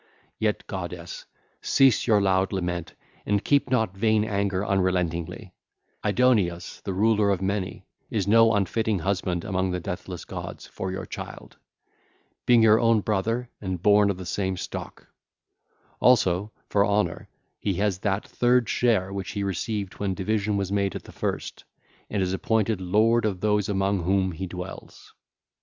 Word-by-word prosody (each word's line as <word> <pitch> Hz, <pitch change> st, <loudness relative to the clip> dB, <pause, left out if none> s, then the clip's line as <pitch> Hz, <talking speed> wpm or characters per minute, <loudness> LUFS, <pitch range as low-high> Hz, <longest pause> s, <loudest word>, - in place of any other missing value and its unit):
Yet, -, -, 0 dB
goddess, -, -, -6 dB, 0.3 s
cease 135 Hz, -5 st, +3 dB
your 110 Hz, -3 st, +5 dB
loud 95 Hz, 0 st, +2 dB
lament 90 Hz, -3 st, -3 dB, 0.3 s
and 105 Hz, 0 st, 0 dB
keep 140 Hz, -2 st, +2 dB
not 110 Hz, -7 st, +1 dB
vain 110 Hz, +1 st, +2 dB
anger 100 Hz, -2 st, -1 dB
unrelentingly: 90 Hz, -4 st, -1 dB, 0.5 s
Aidoneus, 105 Hz, -5 st, +1 dB
the 100 Hz, -, -4 dB
Ruler 105 Hz, +1 st, +2 dB
of 100 Hz, -3 st, +1 dB
Many, 95 Hz, 0 st, -3 dB, 0.2 s
is 100 Hz, -4 st, -1 dB
no 115 Hz, +1 st, +5 dB
unfitting 105 Hz, +2 st, 0 dB
husband 90 Hz, -1 st, -1 dB
among 95 Hz, -2 st, -1 dB
the 90 Hz, 0 st, -2 dB
deathless 90 Hz, -1 st, -6 dB
gods -, -, -7 dB
for 95 Hz, -, -5 dB
your 95 Hz, -, -5 dB
child, -, -, -9 dB, 0.9 s
being 120 Hz, -2 st, +6 dB
your 110 Hz, 0 st, +6 dB
own 115 Hz, -2 st, +3 dB
brother 115 Hz, +5 st, -1 dB
and 95 Hz, -3 st, -3 dB
born 105 Hz, +2 st, +5 dB
of 100 Hz, -, -1 dB
the 95 Hz, -, -7 dB
same 95 Hz, +1 st, -2 dB
stock: -, -, -7 dB, 0.9 s
also, 105 Hz, -5 st, +3 dB, 0.2 s
for 100 Hz, -, +3 dB
honour, 105 Hz, 0 st, 0 dB, 0.3 s
he 100 Hz, -, -1 dB
has 100 Hz, -1 st, 0 dB
that 100 Hz, 0 st, -1 dB
third 125 Hz, -1 st, +2 dB
share 105 Hz, -7 st, +1 dB
which 95 Hz, -2 st, -4 dB
he 100 Hz, -, -2 dB
received 100 Hz, +1 st, -3 dB
when 100 Hz, -2 st, -1 dB
division 105 Hz, +1 st, 0 dB
was 100 Hz, -1 st, -2 dB
made 100 Hz, -2 st, 0 dB
at -, -, -6 dB
the -, -, -13 dB
first, -, -, -4 dB, 0.5 s
and 100 Hz, -2 st, 0 dB
is 90 Hz, 0 st, -1 dB
appointed 110 Hz, 0 st, 0 dB
lord 110 Hz, +6 st, +3 dB
of 100 Hz, -4 st, -1 dB
those 105 Hz, 0 st, +1 dB
among 95 Hz, -1 st, +1 dB
whom 95 Hz, +2 st, +1 dB
he 95 Hz, +3 st, -5 dB
dwells. 90 Hz, +1 st, -9 dB
100 Hz, 155 wpm, -25 LUFS, 95-110 Hz, 0.9 s, being